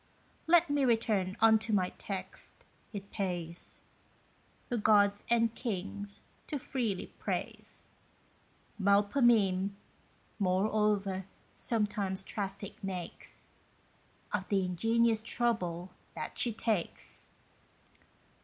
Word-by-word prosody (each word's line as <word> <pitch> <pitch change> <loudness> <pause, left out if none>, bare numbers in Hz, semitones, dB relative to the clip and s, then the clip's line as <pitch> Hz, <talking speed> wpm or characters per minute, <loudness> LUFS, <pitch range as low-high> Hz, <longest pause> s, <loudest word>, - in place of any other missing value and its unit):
Let 345 0 +6
me 285 -1 +2
return 220 -6 +2
unto 220 0 +5
my 185 -3 +2
text: 190 -2 -6 0.3
it 200 -2 -7
pays 175 -3 -3 0.9
The 240 - 0
gods 205 -1 +4
and 230 -1 +3
kings 205 -3 -4 0.2
to 300 - -2
freely 240 -7 -2
praise; - - -4 0.9
Melpomene, 200 -1 +4 0.6
moreover, 195 0 +1 0.3
sometimes 210 -4 -1
traffic 200 -1 -5
makes 185 -3 -6 0.8
Of 190 -2 -1
the 195 -2 +2
ingenious 225 +5 +2
trouble 190 -7 -1 0.2
that - - -5
she 240 - +3
takes. 215 -4 -2
205 Hz, 90 wpm, -32 LUFS, 190-225 Hz, 0.9 s, Let